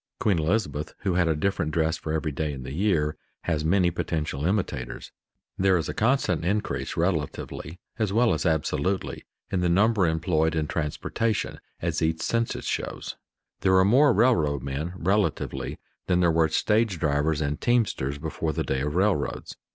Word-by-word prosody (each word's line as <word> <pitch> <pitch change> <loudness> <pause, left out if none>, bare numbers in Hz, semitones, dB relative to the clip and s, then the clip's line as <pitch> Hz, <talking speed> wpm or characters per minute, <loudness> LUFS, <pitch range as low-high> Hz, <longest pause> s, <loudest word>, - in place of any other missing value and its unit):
Queen 95 -6 +2
Elizabeth, 80 -3 -1
who 95 -3 0
had 85 -1 +2
a 80 - +2
different 80 -1 -1
dress 80 0 +1
for 80 - -5
every 80 0 -1
day 75 +2 -2
in 65 -2 -7
the 65 - -6
year, 80 -4 +1 0.3
has 80 -3 -1
many 90 +2 +3
potential 80 -3 -2
imitators. 90 - -2 0.5
There 95 -1 +4
is 80 - -2
a - - -3
constant 115 - +1
increase 105 +4 -1
relatively, 80 -1 -2 0.2
as 110 -3 +1
well 115 +3 +3
as - - -1
absolutely, 80 +3 -1 0.3
in 95 - +1
the 90 - +2
number 100 +1 +3
employed 80 -1 +1
in 80 -1 0
transportation, 85 +9 -2 0.2
as 85 -1 -1
each 80 0 0
census 115 0 -1
shows; - - -3 0.4
there 95 -1 +4
are 95 - +5
more 135 +7 +5
railroad 85 - +2
men 70 +6 -3
relatively 85 -7 -1 0.3
than 90 -1 +3
there 85 -2 +4
were 80 -1 +3
stage 105 +3 +2
drivers 75 0 +1
and 75 -1 -2
teamsters 105 - +1
before 80 +1 -3
the - - -1
day 65 - -1
of 75 +2 -2
railroads. 95 -4 0
85 Hz, 165 wpm, -26 LUFS, 75-100 Hz, 0.5 s, are